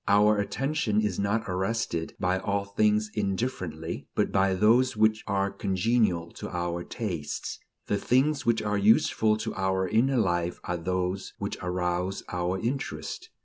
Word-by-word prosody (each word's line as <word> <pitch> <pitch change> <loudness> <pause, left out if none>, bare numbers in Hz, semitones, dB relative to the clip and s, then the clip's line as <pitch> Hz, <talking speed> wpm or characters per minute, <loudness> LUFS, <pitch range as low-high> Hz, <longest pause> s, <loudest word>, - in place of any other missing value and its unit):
Our 105 +1 +5
attention 120 +1 0
is 105 -4 0
not 100 +3 +1
arrested 95 -3 -2
by 90 +1 +1
all 100 +1 -1
things 105 +1 +1
indifferently, 95 -6 -3
but - - +1
by 95 -1 +3
those 115 +5 +4
which 110 0 +3
are 100 0 0
congenial 95 -3 +1
to - - -4
our 85 0 -2
tastes. 90 -11 -4 0.3
The 100 - 0
things 140 +7 +2
which 115 -4 +2
are 105 -1 0
useful 110 +1 +4
to 110 - -4
our 95 -1 0
inner 125 +7 +2
life 85 -5 0
are 90 - -2
those 90 +2 -2
which - - -4
arouse 90 +1 -1
our 90 +1 -1
interest. 115 - -4
100 Hz, 145 wpm, -27 LUFS, 90-110 Hz, 0.3 s, Our